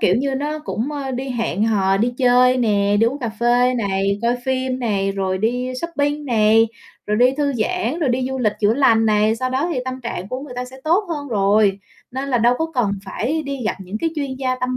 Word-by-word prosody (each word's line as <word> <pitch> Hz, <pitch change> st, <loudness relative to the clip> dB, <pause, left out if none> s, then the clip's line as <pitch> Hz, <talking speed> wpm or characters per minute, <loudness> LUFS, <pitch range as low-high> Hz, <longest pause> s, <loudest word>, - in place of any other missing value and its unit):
kiểu 185 Hz, -, +3 dB
như, 270 Hz, +2 st, -1 dB
nó 295 Hz, +3 st, -2 dB
cũng, 300 Hz, -2 st, -4 dB
ơ, 275 Hz, -2 st, -4 dB
đi 260 Hz, +1 st, -4 dB
hẹn 225 Hz, -4 st, -1 dB
hò, 195 Hz, -3 st, +2 dB
đi 240 Hz, +4 st, 0 dB
chơi 250 Hz, 0 st, +4 dB
nè, 205 Hz, -4 st, +2 dB
đi 225 Hz, -, +5 dB
uống 270 Hz, +4 st, -1 dB
cà 240 Hz, -4 st, -3 dB
phê 245 Hz, +1 st, +3 dB
này, 200 Hz, -2 st, 0 dB
coi 240 Hz, +1 st, +2 dB
phim 260 Hz, -1 st, -1 dB
này, 200 Hz, -5 st, 0 dB
rồi 190 Hz, -1 st, -1 dB
đi 245 Hz, +4 st, -1 dB
shopping 295 Hz, -3 st, -2 dB
này, 225 Hz, -2 st, +4 dB, 0.4 s
rồi 210 Hz, -, 0 dB
đi 250 Hz, +3 st, +5 dB
thư 290 Hz, -1 st, 0 dB
giãn, 305 Hz, +5 st, -1 dB
rồi 300 Hz, -, 0 dB
đi 255 Hz, +1 st, 0 dB
du 265 Hz, 0 st, -3 dB
lịch 215 Hz, -4 st, +1 dB
chữa 210 Hz, +2 st, +3 dB
lành 225 Hz, -5 st, +4 dB
này. 215 Hz, +1 st, +3 dB
Sau 255 Hz, +2 st, -2 dB
đó 275 Hz, +7 st, 0 dB
thì 265 Hz, -, -1 dB
tâm 260 Hz, 0 st, -5 dB
trạng 200 Hz, -6 st, -5 dB
của 255 Hz, +1 st, -4 dB
người 270 Hz, -3 st, -9 dB
ta 250 Hz, -, -2 dB
sẽ 260 Hz, +1 st, -12 dB
tốt 355 Hz, +7 st, +2 dB
hơn 290 Hz, -4 st, -4 dB
rồi, 200 Hz, -1 st, +2 dB, 0.3 s
nên 265 Hz, +2 st, -4 dB
là 250 Hz, -3 st, +2 dB
đâu 240 Hz, +2 st, +4 dB
có 320 Hz, -, 0 dB
cần 230 Hz, -6 st, +1 dB
phải 285 Hz, +11 st, -2 dB
đi 275 Hz, -3 st, -5 dB
gặp -, -, 0 dB
những 190 Hz, +3 st, -6 dB
cái 330 Hz, -, -1 dB
chuyên 280 Hz, -4 st, -3 dB
gia 255 Hz, -1 st, -1 dB
tâm 255 Hz, 0 st, -1 dB
250 Hz, 240 wpm, -20 LUFS, 215-270 Hz, 0.4 s, đi